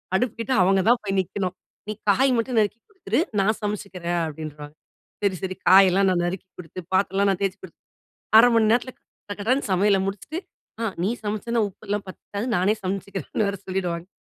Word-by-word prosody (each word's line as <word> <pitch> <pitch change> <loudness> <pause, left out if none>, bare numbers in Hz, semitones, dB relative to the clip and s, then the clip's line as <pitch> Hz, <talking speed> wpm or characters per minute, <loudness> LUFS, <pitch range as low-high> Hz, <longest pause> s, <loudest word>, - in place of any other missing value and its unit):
அடுப்பு 240 +2 +1
கிட்ட 260 +3 -1
அவங்க 195 +1 +3
தான் 240 - +4
போய் 195 -1 -1
நிக்கணும். 185 0 -4 0.3
"நீ 215 - -2 0.2
காய் 265 +6 +3
மட்டும் 230 +1 -1
நறுக்கி 215 +2 0
குடுத்துரு, 380 -6 -2 0.2
நான் 215 +2 +1
சமைச்சிக்கிறேன்" 190 -4 -3
அப்படின்றுவாங்க. 150 -1 -8 0.5
சரி 195 -2 +2
சரி 185 0 -3
காயெல்லாம் 190 +1 +6
நான் 175 -1 +1
நறுக்கி 185 +1 -4
குடுத்து, 180 +1 -8
பாத்திரம்லாம் 195 +1 +2
நான் 190 - -2
தேய்த்து 195 0 -1
குடுத்து, 175 - -12 0.6
1/2 245 +2 +8
மணி 220 -1 +4
நேரத்தில 245 +1 +1 0.4
கடகடன்னு 225 +7 0
சமையல 195 +1 +3
முடிச்சுட்டு, 205 - -4 0.4
ஆ - - 0 0.2
நீ 195 - +2 0.2
சமைச்சேன்னா 215 +3 -1
உப்பெல்லாம் 205 +1 -4
பத்தாது 200 +4 -6
நானே 190 +4 +3
சமைச்சிக்கிறேன்னு 195 +2 -2
வேற 200 - -2
சொல்லிவிடுவாங்க. 180 -2 -3
195 Hz, 165 wpm, -24 LUFS, 185-215 Hz, 0.6 s, 1/2